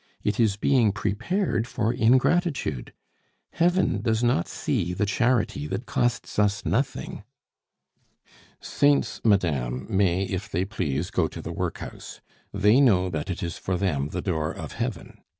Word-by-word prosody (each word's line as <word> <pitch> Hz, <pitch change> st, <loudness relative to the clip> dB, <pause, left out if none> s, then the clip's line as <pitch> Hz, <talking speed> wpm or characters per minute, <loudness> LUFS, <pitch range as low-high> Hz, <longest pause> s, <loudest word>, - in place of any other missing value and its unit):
It 105 Hz, +1 st, -1 dB
is 110 Hz, -4 st, +3 dB
being 120 Hz, -2 st, +3 dB
prepared 115 Hz, -, -1 dB
for 120 Hz, -3 st, -1 dB
ingratitude! 130 Hz, -, +1 dB, 0.6 s
Heaven 175 Hz, -, +2 dB
does 110 Hz, +1 st, 0 dB
not 120 Hz, -8 st, +2 dB
see 90 Hz, +1 st, -2 dB
the 105 Hz, -, 0 dB
charity 105 Hz, -, 0 dB
that -, -, -4 dB
costs 115 Hz, -3 st, -1 dB
us 105 Hz, 0 st, +1 dB
nothing 130 Hz, -2 st, -2 dB, 0.7 s
" -, -, -57 dB, 0.6 s
"Saints, 145 Hz, 0 st, +1 dB
madame, 70 Hz, -, +1 dB
may 95 Hz, -1 st, +2 dB
if 95 Hz, +2 st, -4 dB
they 90 Hz, +2 st, -1 dB
please 80 Hz, -6 st, -2 dB
go -, -, +1 dB
to -, -, -9 dB
the -, -, -6 dB
workhouse; -, -, -5 dB, 0.3 s
they 105 Hz, +6 st, +4 dB
know 95 Hz, -9 st, +4 dB
that 80 Hz, +3 st, -3 dB
it 90 Hz, -, -3 dB
is 85 Hz, -1 st, -4 dB
for 95 Hz, -1 st, -2 dB
them 75 Hz, -7 st, -1 dB
the -, -, -4 dB
door 80 Hz, -5 st, -1 dB
of -, -, -7 dB
heaven. -, -, -5 dB
105 Hz, 150 wpm, -25 LUFS, 90-120 Hz, 0.7 s, they